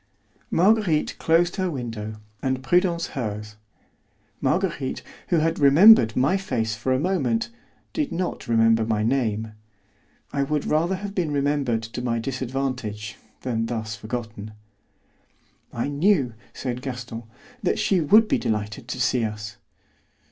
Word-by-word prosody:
Marguerite 185 -4 +2
closed 170 +3 +2
her 185 -1 0
window 115 -7 -5 0.3
and 130 -1 -1
Prudence 175 +2 +2
hers. 105 -5 -4 0.9
Marguerite, 160 -6 -1 0.2
who 175 - +1
had 165 +1 +1
remembered 140 - +7
my 135 +9 +3
face 115 - -2
for 120 +4 -2
a 130 - +2
moment, 225 - 0 0.4
did 300 -4 -1
not 180 +1 -3
remember 115 -1 +4
my 110 -1 0
name. 110 -3 0 0.8
I 140 - 0
would 145 +1 -1
rather 170 +5 +1
have 200 +1 -6
been 180 -5 0
remembered 140 -5 0
to 115 +2 -6
my 120 -2 0
disadvantage 125 -4 -3 0.2
than 115 -3 -1
thus 110 -2 -3
forgotten. 110 -1 -6 1.2
"I 120 - -2
knew," 145 - +2 0.2
said 125 -1 -4
Gaston, 125 -3 -6 0.4
"that 190 - +1
she 190 -3 +2
would 215 +8 +6
be - - +1
delighted 105 +1 -3
to 125 - -5
see 125 -1 +2
us." 105 -1 -5
130 Hz, 135 wpm, -24 LUFS, 115-170 Hz, 1.2 s, remembered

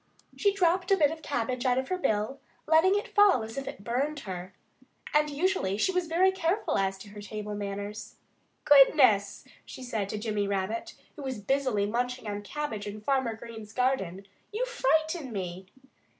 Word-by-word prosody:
She 405 - +3
dropped 365 -1 +1
a 390 - +5
bit 295 -3 +4
of 320 0 -7
cabbage 250 -3 -2
out 250 -1 +2
of 260 0 -2
her 370 - 0
bill, 220 - 0 0.3
letting 325 +5 +5
it 410 - -5
fall 405 - +5
as 225 0 -8
if 275 -1 -5
it 195 - -7
burned 275 +6 -1
her. 185 -1 -7 0.6
And 300 0 +3
usually 290 - 0
she 295 - +2
was 365 -2 -1
very 360 +4 +3
careful 380 - 0
as 195 0 0
to 205 +2 -12
her 205 0 -10
table 210 0 -6
manners. 205 +1 -5 0.5
"Goodness!" 260 -9 +5 0.2
she 260 - -10
said 220 -5 -3
to 215 - -3
Jimmy 210 -2 -1
Rabbit, 200 +3 -2 0.2
who 300 - -9
was 265 -3 -4
busily 240 -1 0
munching 235 -2 -2
cabbage 215 -2 -4
in 205 +1 -6
Farmer 260 0 0
Green's 220 -2 -10
garden. 200 -8 -1 0.3
"You 450 +4 -1
frighten 320 - 0
me!" 185 -2 -5
245 Hz, 175 wpm, -28 LUFS, 205-310 Hz, 0.6 s, a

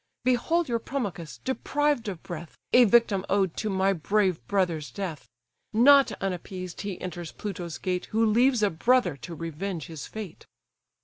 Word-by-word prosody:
Behold 280 +7 +2
your 235 -2 0
Promachus 205 - -4
deprived 285 -1 0
of 185 -5 -5
breath, 170 -1 -8 0.2
A 250 0 +8
victim 210 -3 +4
owed 190 -4 +1
to 215 - -1
my 195 0 +2
brave 185 - +1
brother's 175 -6 0
death. 160 - -6 0.4
Not 275 +5 +6
unappeased 185 -1 -4
he 200 -3 -5
enters 175 -2 -6
Pluto's 175 -5 -5
gate, 180 -1 -2
Who 225 +1 +1
leaves 235 +2 +3
a 205 - +3
brother 225 - +2
to 150 +7 -8
revenge 165 +1 -4
his 160 -3 -8
fate." 215 -6 -8
195 Hz, 150 wpm, -27 LUFS, 175-235 Hz, 0.4 s, A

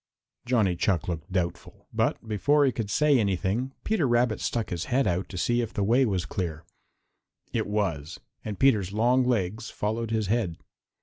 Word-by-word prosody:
Johnny 110 -8 +2
Chuck 85 -1 0
looked 85 +1 -4
doubtful, 90 -2 -3
but - - 0
before 140 +8 +3
he 135 - +3
could 110 -3 -4
say 145 +4 +4
anything 100 +5 0
Peter 215 -10 +1
Rabbit 120 -2 +2
stuck 115 -2 -2
his 85 -2 -2
head 135 +1 +1
out 90 0 -1
to 90 - -7
see 120 +6 +1
if 115 -2 -5
the 100 - 0
way 120 +5 +4
was 95 -5 -1
clear. 80 0 -4 0.9
It - - 0
was, 90 -8 -2 0.2
and 105 -2 -5
Peter's 105 -9 +3
long 120 +4 +3
legs 110 -2 -1
followed 110 +2 -2
his 110 -1 0
head. 100 -5 0
105 Hz, 175 wpm, -27 LUFS, 95-120 Hz, 0.9 s, say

